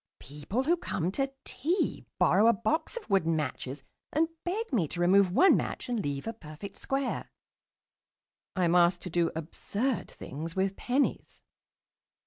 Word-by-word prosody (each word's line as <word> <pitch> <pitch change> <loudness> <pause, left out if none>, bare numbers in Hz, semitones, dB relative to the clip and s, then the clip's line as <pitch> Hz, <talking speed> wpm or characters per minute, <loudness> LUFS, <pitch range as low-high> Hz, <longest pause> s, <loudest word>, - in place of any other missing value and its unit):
People 150 - -3
who 340 +5 +3
come 180 - -2
to 270 +5 -1
tea 335 +9 -1
borrow 215 - +5
a 235 - +7
box 315 - -1
of 475 - -7
wooden 175 -5 +2
matches 135 -2 -3 0.3
and 320 +3 +2
beg 400 0 -3
me 185 -10 +2
to 175 - -6
remove 185 +1 +5
one 375 - +6
match - - -2
and 240 -3 0
leave 140 -1 -3
a 225 - -3
perfect 180 0 -10
square. 270 -1 -2 1.3
I 185 -2 +2
am 170 - +2
asked 175 0 +4
to 180 - -5
do 170 0 +2
absurd 205 - -2
things 160 +5 -7
with 190 +1 0
pennies.... 265 +3 -1
195 Hz, 155 wpm, -29 LUFS, 165-270 Hz, 1.3 s, a